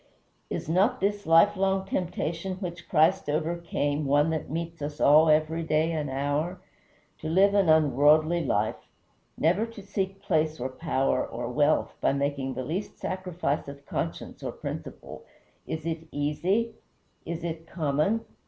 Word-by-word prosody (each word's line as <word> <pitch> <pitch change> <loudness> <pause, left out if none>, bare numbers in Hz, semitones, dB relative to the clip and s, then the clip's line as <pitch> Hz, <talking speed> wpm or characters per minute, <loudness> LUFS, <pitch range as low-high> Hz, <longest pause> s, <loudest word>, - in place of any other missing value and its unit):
Is - - -4
not 185 +9 +2
this 205 0 -1
lifelong 190 +3 +4
temptation 180 0 -2
which 175 -2 -7
Christ 160 +1 +3
overcame 155 -2 -1
one 145 +3 +3
that 160 -2 -3
meets 165 +1 -4
us 145 +1 -5
all 155 +2 +6
every 155 +2 +2
day 160 0 +1
and 150 -3 -2
hour? 145 +7 -1 0.6
To 155 - -4
live 195 +4 +4
an 200 -4 +3
unworldly 155 +2 +4
life; 110 -5 -1 0.5
never 175 +7 +2
to 225 -3 -11
seek 195 -1 -3
place 155 -2 0
or 130 +2 -2
power 135 -1 0
or 120 +1 -5
wealth 145 +4 +2
by - - +3
making 140 -1 -2
the 130 - -3
least 180 +8 -4
sacrifice 180 -6 -2
of 140 0 -10
conscience - - -4
or - - -3
principle; - - -7 0.4
is 160 -1 -4
it 165 -1 -4
easy? 180 +11 0 0.5
is 170 0 -5
it 165 -1 -5
common? 155 +7 0
160 Hz, 145 wpm, -27 LUFS, 145-180 Hz, 0.6 s, all